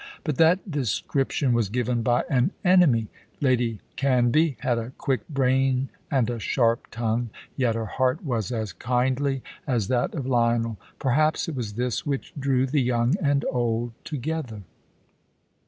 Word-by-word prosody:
But 150 -5 -2
that 175 +4 +3
description 135 0 0
was 115 -4 +1
given 120 +1 0
by 120 +1 +2
an 130 +7 +1
enemy. 165 -12 +5 0.3
Lady 120 -6 +1 0.2
Canvey 135 +3 +3
had 120 -2 +1
a 115 +3 -6
quick 130 -6 -1
brain 135 -1 +1 0.2
and 130 -5 +2
a 120 -1 -3
sharp 115 0 +1
tongue, 115 +1 -1 0.3
yet 120 -4 +1
her 115 -1 -2
heart 130 +7 0
was 120 -4 -1
as 110 -5 -3
kindly 130 +4 0 0.2
as 115 -7 0
that 125 +4 0
of 140 -5 -3
Lionel. 115 -4 +1 0.2
Perhaps 155 +4 +1
it 165 - -3
was 115 -5 -4
this 120 -1 -2
which 140 -2 -3
drew 135 -1 +2
the 140 +2 +1
young 120 +1 +2
and 145 -2 +2
old 120 -1 0
together. 145 -7 -4
125 Hz, 150 wpm, -25 LUFS, 115-140 Hz, 0.3 s, enemy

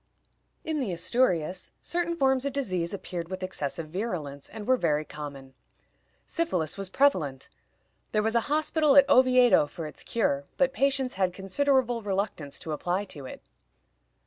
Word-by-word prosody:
In 315 -3 -2
the 245 -8 -1
Asturias 180 -3 0
certain 340 0 -1
forms 265 -4 +2
of 280 -1 -2
disease 185 -11 -1
appeared 175 -4 -5
with 185 0 -5
excessive 160 -3 -3
virulence, 155 -7 -4
and 210 0 -8
were 255 - +4
very 155 -8 0
common. 140 -3 -8 0.7
Syphilis 185 - -1
was 195 -1 -4
prevalent. 180 - +1 0.6
There 215 - +1
was 220 +1 +1
a 235 - +4
hospital 305 -1 +3
at 280 -1 +8
Oviedo 255 - +5
for 160 +2 -7
its 150 - -8
cure, 140 -11 0
but 270 -1 +2
patients 270 -2 +1
had 185 -1 +2
considerable 245 +4 +1
reluctance 195 -8 -3
to 160 - -5
apply 180 +6 -1
to 140 -4 -8
it. - - -10
195 Hz, 150 wpm, -27 LUFS, 160-265 Hz, 0.7 s, at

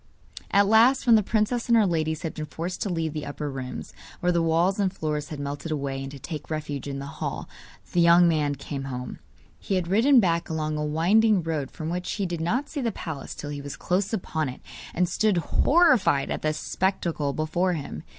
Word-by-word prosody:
At 200 0 +4
last, 230 +7 +5
when 240 - +6
the 215 - +5
princess 220 +4 0
and 235 -1 +5
her 215 - +5
ladies 160 -2 -1
had 165 - -3
been 155 -1 -5
forced 165 +6 -5
to 205 - -1
leave 165 -3 -2
the 150 -1 -4
upper 145 0 -5
rooms, 130 -1 -6 0.3
where 180 - +2
the 170 -1 +2
walls 170 +4 +2
and 195 -2 +2
floors 150 -5 -3
had 150 - -6
melted 145 +3 -5
away, 140 -2 -2
and 135 - -5
to 140 - -9
take 150 +3 -7
refuge 150 -3 -4
in 140 -1 -4
the 140 - -5
hall, 140 - -5 0.4
the 175 - +3
young 170 +1 +6
man 150 -3 +1
came 140 0 -6
home. 125 -2 -6 0.4
He 195 - -2
had 180 -2 -1
ridden 245 +7 +5
back 170 -5 +1
along 155 -1 -2
a 150 - -2
winding 185 +6 +3
road 155 -4 -2
from 160 -1 -5
which 180 +1 -3
he 200 - -2
did 170 -2 -3
not 245 - 0
see 290 -1 -4
the 235 -2 0
palace 160 -8 -6
till 145 - -6
he 145 -1 -5
was 140 -1 -7
close 185 +2 0
upon 160 - -2
it, 125 - -9 0.3
and 180 +1 +2
stood 210 +1 +1
horrified 255 - +3
at - - -2
the 155 0 0
spectacle 170 -4 -1
before 170 +5 0
him. 140 - -5
165 Hz, 220 wpm, -26 LUFS, 150-195 Hz, 0.4 s, when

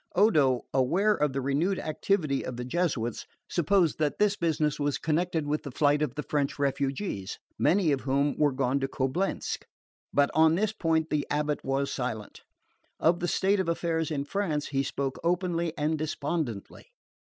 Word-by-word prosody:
Odo, 150 - +4
aware 175 +12 +3
of 150 -7 0
the 135 +1 -2
renewed 150 +9 +1
activity 155 -2 0
of 125 - -5
the 125 - -4
Jesuits, 130 -6 -1 0.2
supposed 175 -1 +2
that 150 -2 0
this 210 -1 +3
business 155 -4 0
was 145 -1 0
connected 160 0 0
with 150 +1 -1
the 140 - -7
flight 145 +2 +2
of 150 -5 -1
the 150 - -3
French 145 -2 -1
refugees, 140 - -2 0.2
many 180 -4 +3
of 135 -2 0
whom 140 +2 +1
were 150 -1 +3
gone 135 +1 0
to 135 - -1
Coblentz; 135 +9 -1 0.5
but 140 0 +3
on 160 0 +5
this 210 +3 0
point 160 -5 0
the 150 -1 0
abate 150 0 -1
was 135 +1 -1
silent. 120 -5 -4 0.6
Of 170 +2 +3
the 175 - -1
state 195 +3 +2
of 185 -3 0
affairs 165 -1 -1
in 140 -3 -2
France 155 -4 -2
he 135 -1 +1
spoke 135 0 -3
openly 170 -1 0
and 155 +1 0
despondently. 145 - -3
150 Hz, 170 wpm, -28 LUFS, 140-170 Hz, 0.6 s, on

